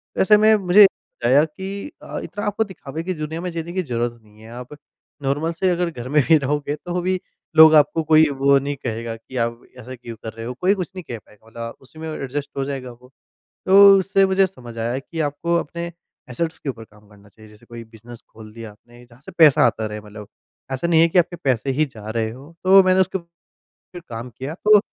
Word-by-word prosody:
तो -, -, +1 dB
ऐसे 210 Hz, +2 st, +6 dB
में 215 Hz, +1 st, +5 dB
मुझे 200 Hz, 0 st, +6 dB
बताया 135 Hz, -6 st, +1 dB
कि 195 Hz, -, -7 dB
अ, -, -, -6 dB
इतना 205 Hz, 0 st, -6 dB
आपको 205 Hz, +2 st, 0 dB
दिखावे 165 Hz, -6 st, -8 dB
की 185 Hz, +2 st, -3 dB
दुनिया 155 Hz, 0 st, -5 dB
में 180 Hz, -, -4 dB
जीने 170 Hz, +1 st, -6 dB
की 185 Hz, -1 st, -1 dB
ज़रूरत 120 Hz, -3 st, -3 dB
नहीं 105 Hz, 0 st, -21 dB
है। 110 Hz, -, -13 dB
आप 125 Hz, +3 st, -9 dB, 0.5 s
नॉर्मल 145 Hz, +5 st, -1 dB
से 185 Hz, +3 st, 0 dB
अगर 175 Hz, -1 st, 0 dB
घर 125 Hz, -5 st, -8 dB
में 150 Hz, 0 st, +3 dB
ही 160 Hz, -, +7 dB
रहोगे 145 Hz, +1 st, -2 dB
तो 175 Hz, 0 st, -2 dB
भी 185 Hz, +1 st, -1 dB, 0.4 s
लोग 160 Hz, 0 st, +9 dB
आपको 150 Hz, +2 st, +3 dB
कोई 155 Hz, 0 st, +5 dB
वो 140 Hz, 0 st, +5 dB
नहीं 145 Hz, +1 st, -4 dB
कहेगा 115 Hz, -3 st, -5 dB
कि 120 Hz, +3 st, -10 dB
आप 115 Hz, 0 st, -2 dB, 0.2 s
ऐसा 125 Hz, +1 st, -9 dB
क्यों 120 Hz, -1 st, -10 dB
कर 110 Hz, -, -6 dB
रहे 115 Hz, 0 st, -8 dB
हो। 125 Hz, -, -4 dB
कोई 190 Hz, +3 st, +4 dB
कुछ 185 Hz, -1 st, -5 dB
नहीं 185 Hz, -, -7 dB
कह 120 Hz, -, -4 dB
पाएगा 105 Hz, 0 st, -21 dB
मतलब 115 Hz, 0 st, -8 dB
उसी 135 Hz, +4 st, -16 dB
में 160 Hz, 0 st, -6 dB
ऐडजस्ट 140 Hz, -1 st, -5 dB
हो 135 Hz, -, 0 dB
जाएगा 135 Hz, -3 st, -5 dB
वो 125 Hz, +1 st, -18 dB, 0.6 s
तो 195 Hz, +1 st, +8 dB
उससे 195 Hz, +1 st, +2 dB
मुझे 190 Hz, 0 st, +3 dB
समझ 120 Hz, -10 st, -12 dB
आया 120 Hz, +3 st, -2 dB
कि 160 Hz, +4 st, -7 dB
आपको 155 Hz, +3 st, -1 dB
अपने 170 Hz, +2 st, -5 dB, 0.4 s
एसेट्स 160 Hz, +6 st, -3 dB
के -, -, -8 dB
ऊपर 115 Hz, -2 st, -10 dB
कम 105 Hz, -1 st, -22 dB
करना 105 Hz, 0 st, -19 dB
चाहिए 110 Hz, +1 st, -18 dB
जैसे 105 Hz, 0 st, -20 dB
कोई 115 Hz, 0 st, -9 dB
बिज़नेस 115 Hz, +1 st, -14 dB
खोल 110 Hz, -1 st, -13 dB
दिया 115 Hz, -1 st, -9 dB
आपने 120 Hz, +3 st, -19 dB
जहाँ 120 Hz, +1 st, -21 dB
से -, -, -9 dB
पैसा 150 Hz, -6 st, +6 dB
आता 110 Hz, -2 st, -1 dB
रहे 105 Hz, 0 st, -6 dB
मतलब 105 Hz, 0 st, -12 dB, 0.4 s
ऐसा 135 Hz, +6 st, -2 dB
नहीं 165 Hz, -2 st, +4 dB
है 165 Hz, -, +5 dB
कि 180 Hz, -, +1 dB
आपके 175 Hz, 0 st, +1 dB
पैसे 130 Hz, 0 st, 0 dB
ही 150 Hz, +4 st, +1 dB
जा 110 Hz, -5 st, -12 dB
रहे 110 Hz, -1 st, -2 dB
हो। 135 Hz, +7 st, -13 dB
तो 190 Hz, +1 st, +7 dB
मैंने 185 Hz, 0 st, +3 dB
उसके 190 Hz, +1 st, 0 dB
फिर 170 Hz, -1 st, -23 dB, 0.6 s
काम 115 Hz, +2 st, -7 dB
किया 130 Hz, +5 st, -7 dB
तो 210 Hz, 0 st, +7 dB
140 Hz, 230 wpm, -21 LUFS, 115-170 Hz, 0.6 s, लोग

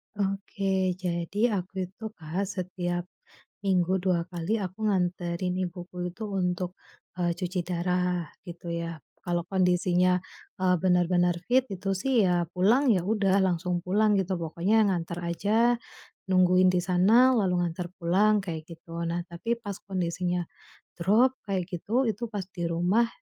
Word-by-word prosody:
Oke, 195 Hz, -2 st, -1 dB
jadi 175 Hz, +1 st, -3 dB, 0.2 s
aku 185 Hz, +1 st, -9 dB, 0.2 s
itu, 215 Hz, -, -16 dB
Kak, 175 Hz, +5 st, -3 dB
setiap 180 Hz, -2 st, -3 dB, 0.6 s
minggu 185 Hz, -2 st, +2 dB
2 180 Hz, -3 st, +2 dB
kali 175 Hz, +5 st, -1 dB
aku 190 Hz, +4 st, -3 dB
nganterin 180 Hz, -2 st, 0 dB
ibuku 180 Hz, 0 st, -7 dB
itu 215 Hz, +5 st, -8 dB, 0.2 s
untuk, 180 Hz, 0 st, -1 dB, 0.5 s
eee, 175 Hz, -1 st, +2 dB
cuci 180 Hz, 0 st, -2 dB
darah 180 Hz, -1 st, -1 dB, 0.2 s
gitu 175 Hz, 0 st, -9 dB
ya. 165 Hz, -3 st, -4 dB, 0.2 s
Kalau 175 Hz, -1 st, 0 dB
kondisinya, 180 Hz, -1 st, +3 dB, 0.4 s
eee, 180 Hz, -1 st, +4 dB
bener-bener 180 Hz, -1 st, +3 dB
fit, 255 Hz, +1 st, +4 dB
itu 195 Hz, 0 st, -3 dB
sih 260 Hz, -5 st, +3 dB
ya 175 Hz, -1 st, +1 dB
pulang, 225 Hz, +10 st, +3 dB
ya 180 Hz, -, 0 dB
udah 200 Hz, -1 st, +2 dB
langsung 175 Hz, -1 st, 0 dB
pulang 210 Hz, +3 st, +3 dB
gitu, 190 Hz, -1 st, -1 dB
pokoknya 180 Hz, +7 st, +2 dB
nganter 170 Hz, -3 st, -2 dB
aja, 170 Hz, +4 st, -2 dB, 0.8 s
nungguin 185 Hz, 0 st, +5 dB
di 180 Hz, -, +2 dB
sana, 200 Hz, +9 st, +4 dB
lalu 195 Hz, -6 st, +2 dB
nganter 175 Hz, +1 st, -4 dB
pulang 200 Hz, +5 st, +3 dB
kayak 165 Hz, -4 st, -5 dB
gitu. 165 Hz, 0 st, -7 dB
Nah 170 Hz, +1 st, -1 dB
tapi 175 Hz, +8 st, -2 dB
pas 200 Hz, -2 st, -4 dB
kondisinya 180 Hz, -1 st, -1 dB, 0.6 s
drop 215 Hz, +9 st, +4 dB, 0.2 s
kayak 190 Hz, -2 st, 0 dB
gitu, 225 Hz, +9 st, 0 dB
itu 220 Hz, +1 st, -2 dB
pas 205 Hz, -2 st, -2 dB
di 175 Hz, -, -3 dB
rumah, 180 Hz, +8 st, +2 dB
180 Hz, 140 wpm, -27 LUFS, 175-195 Hz, 0.8 s, nungguin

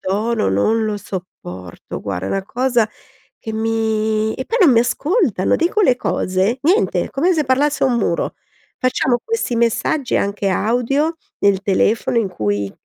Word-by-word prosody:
tono 215 Hz, -, 0 dB
non 220 Hz, -, +1 dB
lo 210 Hz, -1 st, -1 dB
sopporto. 95 Hz, -, -8 dB
Guarda 95 Hz, -2 st, -3 dB
è -, -, -3 dB
una 195 Hz, -, -1 dB
cosa 245 Hz, 0 st, +1 dB, 0.5 s
che 220 Hz, -, -6 dB
mi 220 Hz, -1 st, 0 dB
e 260 Hz, -, -5 dB
poi 475 Hz, -, -1 dB
non 300 Hz, -, +7 dB
mi 230 Hz, -, +5 dB
ascoltano, 285 Hz, -, +1 dB
dico 350 Hz, +6 st, +1 dB
le 255 Hz, -9 st, +4 dB
cose, 190 Hz, +3 st, 0 dB
niente! 370 Hz, +9 st, +2 dB
Come 345 Hz, +7 st, +1 dB
se 305 Hz, -, +1 dB
parlassi 280 Hz, +3 st, +1 dB
a -, -, +5 dB
un 245 Hz, -2 st, +1 dB
muro. 170 Hz, -6 st, -1 dB, 0.4 s
Facciamo 255 Hz, -1 st, +1 dB
questi 450 Hz, -, -1 dB
messaggi, 235 Hz, +4 st, 0 dB
anche 200 Hz, 0 st, -1 dB
audio 250 Hz, -, 0 dB, 0.2 s
nel 200 Hz, -1 st, +2 dB
telefono, 215 Hz, +4 st, +1 dB
in 215 Hz, -, 0 dB
cui 100 Hz, -, -2 dB
225 Hz, 160 wpm, -19 LUFS, 195-260 Hz, 0.5 s, non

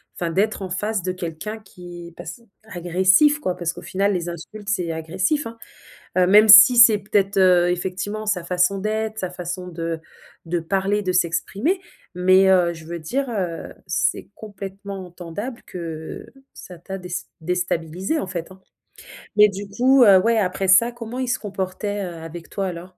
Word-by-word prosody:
enfin 170 Hz, -, -3 dB
d'être 205 Hz, +5 st, 0 dB
en 190 Hz, -, -5 dB
face 210 Hz, +3 st, -2 dB
de 185 Hz, +1 st, -2 dB
quelqu'un 180 Hz, +4 st, -6 dB
qui 175 Hz, -4 st, -12 dB
passe -, -, -9 dB, 0.2 s
agressif, 190 Hz, -, +3 dB
quoi. 185 Hz, -11 st, -3 dB
Parce 170 Hz, -1 st, -2 dB
qu'au -, -, -10 dB
final 200 Hz, +1 st, 0 dB
les 175 Hz, -2 st, -3 dB
insultes 200 Hz, +5 st, -8 dB
c'est 180 Hz, -5 st, -1 dB
agressif, 185 Hz, -, -1 dB
hein, 230 Hz, 0 st, -10 dB, 0.6 s
heu, 180 Hz, -, +5 dB
même 210 Hz, +4 st, +6 dB
si 215 Hz, +4 st, +9 dB
c'est 225 Hz, -3 st, +8 dB
peut-être, 200 Hz, 0 st, 0 dB
heu, 180 Hz, -2 st, +5 dB
effectivement 190 Hz, +4 st, -3 dB
sa 190 Hz, -5 st, -1 dB
façon 180 Hz, +2 st, +1 dB
d'être, 215 Hz, +1 st, -2 dB
sa 185 Hz, -, -3 dB
façon 180 Hz, 0 st, -6 dB
de 165 Hz, -1 st, -4 dB, 0.5 s
de 170 Hz, +1 st, -1 dB
parler, 195 Hz, +4 st, -1 dB
de 185 Hz, -2 st, -1 dB
s'exprimer 195 Hz, -, 0 dB, 0.3 s
mais 185 Hz, +1 st, +4 dB
heu, 180 Hz, -2 st, +3 dB
je 160 Hz, -1 st, -12 dB
veux 170 Hz, +1 st, -6 dB
dire, 260 Hz, -, -3 dB
heu, 185 Hz, -7 st, -4 dB
c'est -, -, -1 dB
complètement 195 Hz, -2 st, -8 dB
entendable 180 Hz, +8 st, -7 dB
que 160 Hz, -3 st, -7 dB, 0.3 s
ça 180 Hz, -, -11 dB
t'a 190 Hz, +3 st, -7 dB
dés 180 Hz, -2 st, -8 dB, 0.3 s
déstabilisée 180 Hz, -, -2 dB
en -, -, -4 dB
fait, 175 Hz, -1 st, -6 dB
hein, 190 Hz, 0 st, -15 dB, 0.7 s
mais 210 Hz, 0 st, +7 dB
du 200 Hz, +1 st, -7 dB
coup, 255 Hz, +5 st, +4 dB
heu, 200 Hz, -4 st, +8 dB
ouais 230 Hz, +4 st, +2 dB
après 190 Hz, -1 st, -1 dB
ça 215 Hz, +6 st, +5 dB
comment 240 Hz, +1 st, -7 dB
il 260 Hz, -, -2 dB
se -, -, +1 dB
comportait, 200 Hz, 0 st, -4 dB
heu, 175 Hz, -2 st, -7 dB
avec 165 Hz, +1 st, -9 dB
toi 195 Hz, -, -3 dB
alors? 180 Hz, +1 st, -8 dB
190 Hz, 175 wpm, -22 LUFS, 175-210 Hz, 0.7 s, si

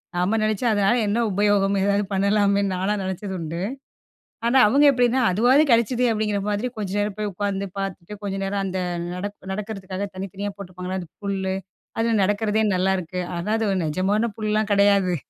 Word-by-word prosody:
நாம 180 Hz, +5 st, +1 dB
நெனைச்சா 215 Hz, +2 st, 0 dB
அதனால 205 Hz, +4 st, +3 dB
என்ன 230 Hz, +4 st, +1 dB
உபயோகம் 200 Hz, 0 st, +2 dB
ஏதாவது, 200 Hz, +1 st, +2 dB
பண்ணலாமேன்னு 200 Hz, 0 st, +2 dB
நான்லாம் 195 Hz, +3 st, -1 dB
நெனச்சதுண்டு. 185 Hz, -3 st, -4 dB, 0.9 s
ஆனா, 240 Hz, +3 st, +3 dB
அவுங்க 280 Hz, +6 st, +4 dB
எப்படின்னா, 250 Hz, 0 st, +2 dB
"அதுவாது 245 Hz, +9 st, +4 dB
கெடச்சதே" 235 Hz, +2 st, +3 dB
அப்படிங்கிற 210 Hz, -2 st, 0 dB
மாதிரி 210 Hz, +4 st, -1 dB
கொஞ்சம் 205 Hz, -1 st, -3 dB
நேரம் 205 Hz, -1 st, -1 dB
போய் 210 Hz, -1 st, -2 dB
உக்காந்து, 200 Hz, +1 st, -2 dB
பாத்துட்டு, 195 Hz, 0 st, -5 dB
கொஞ்ச 195 Hz, -1 st, -2 dB
நேரம் 195 Hz, 0 st, -1 dB
அந்த 190 Hz, 0 st, -2 dB, 0.3 s
நடப் 200 Hz, +1 st, -6 dB
நடக்கறதுக்காக 195 Hz, -1 st, -4 dB
தனித்தனியா 195 Hz, +2 st, -5 dB
போட்டுருப்பாங்கள 185 Hz, -1 st, -6 dB
அந்த 175 Hz, -3 st, -9 dB, 0.2 s
புல்லு, 190 Hz, -1 st, -1 dB, 0.4 s
அதில 225 Hz, 0 st, +1 dB
நடக்கிறதே 210 Hz, +2 st, +1 dB
நல்லாயிருக்கு. 185 Hz, -1 st, 0 dB, 0.2 s
ஆனா, 170 Hz, +4 st, -4 dB
அது 220 Hz, -2 st, 0 dB
ஒரு 190 Hz, -, 0 dB
நிஜமான 200 Hz, +8 st, 0 dB
புல்லெலாம் 215 Hz, -1 st, 0 dB
கெடையாது. 200 Hz, -2 st, +4 dB
200 Hz, 155 wpm, -23 LUFS, 190-215 Hz, 0.9 s, அவுங்க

